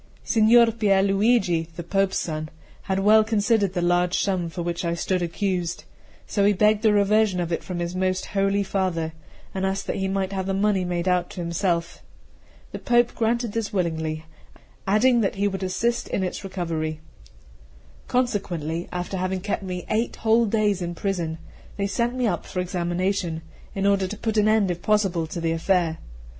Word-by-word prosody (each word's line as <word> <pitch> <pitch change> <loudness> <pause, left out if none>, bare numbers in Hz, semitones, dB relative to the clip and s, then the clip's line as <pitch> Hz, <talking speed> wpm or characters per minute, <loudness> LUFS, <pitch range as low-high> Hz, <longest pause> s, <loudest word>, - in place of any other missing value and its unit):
CII - - -13
SIGNOR 230 +1 +6
PIER 205 -4 +2
LUIGI, 195 -4 +2
the 170 - -5
Pope's 195 +2 +1
son, 155 -1 -3 0.4
had 190 0 +1
well 215 +2 +6
considered 210 -2 +1
the 175 -2 -1
large 175 0 +2
sum 185 -4 0
for 170 +1 -5
which 170 +1 -3
I 170 0 0
stood 185 +2 -1
accused; 175 0 -2 0.4
so 200 - 0
he 205 +1 +5
begged 210 +2 +3
the 220 -2 +4
reversion 205 -1 +3
of 175 -1 -2
it 165 - -2
from 180 - -5
his 175 +1 -3
most 185 0 0
holy 195 0 +2
father, 185 -5 -1 0.4
and 190 - -3
asked 190 0 -1
that - - -2
he 190 - -1
might 195 0 -1
have 190 -1 -2
the 195 - 0
money 195 -1 +2
made 175 0 -2
out 180 -1 +1
to - - -9
himself. 170 0 -1 0.7
The - - -6
Pope 240 0 +2
granted 235 0 0
this 225 -1 -2
willingly, 160 -4 -2 0.6
adding 235 +4 +4
that 195 - 0
he 200 +1 +1
would 195 -1 -3
assist 225 +6 -1
in 190 - -1
its 185 - -4
recovery. 165 -5 -3 1.1
Consequently, 175 -10 -1
after 180 +2 -3
having 185 +1 -1
kept 205 +2 -2
me 180 -2 -5
eight 225 +2 -1
whole 225 +1 +3
days 210 -3 +1
in 175 0 -3
prison, 170 -4 -2 0.4
they 200 - 0
sent 235 +5 -1
me 255 -1 0
up 180 -7 -1
for 185 - -4
examination, 175 -1 -1 0.3
in 195 0 -1
order 200 -1 +3
to 210 - -6
put 220 0 -2
an 210 0 +4
end 215 -4 +3
if 175 0 -5
possible 195 -6 +1
to 165 - -5
the 165 -1 0
affair. 165 -1 +1
190 Hz, 185 wpm, -24 LUFS, 175-210 Hz, 1.1 s, SIGNOR